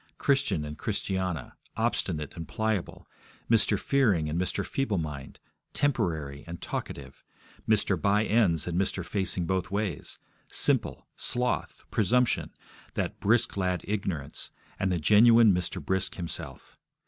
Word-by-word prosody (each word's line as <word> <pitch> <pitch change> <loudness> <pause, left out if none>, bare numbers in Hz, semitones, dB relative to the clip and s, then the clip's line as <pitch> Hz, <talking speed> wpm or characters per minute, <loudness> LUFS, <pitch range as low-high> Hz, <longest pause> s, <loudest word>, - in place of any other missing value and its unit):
Christian 135 - +1
and 75 +1 -7
Christiana, 95 - -2 0.2
Obstinate 75 0 -1
and 85 -2 -6
Pliable, 110 -4 -2 0.4
Mr. 110 -3 +4
Fearing 105 - +2
and 85 +4 0
Mr. 95 - -1
Feeblemind, 80 - -2 0.4
Temporary 80 - 0
and 85 0 -6
Talkative, - - -6 0.5
Mr. 100 -5 +2
By 105 +4 +3
ends 95 -8 +3
and 90 +1 0
Mr. 95 -2 -2
Facing 95 -2 -1
both 95 0 -1
ways, 100 -4 -3 0.3
Simple, - - +1
Sloth, 125 0 -1
Presumption, 120 +3 +2 0.5
that - - -2
brisk 120 +3 +2
lad 90 -3 0
Ignorance, 95 -9 -3 0.3
and 95 -1 +1
the 90 - +1
genuine 110 +5 +6
Mr. 90 0 -2
Brisk 95 0 -1
himself. 85 -2 -7
95 Hz, 125 wpm, -28 LUFS, 85-110 Hz, 0.5 s, genuine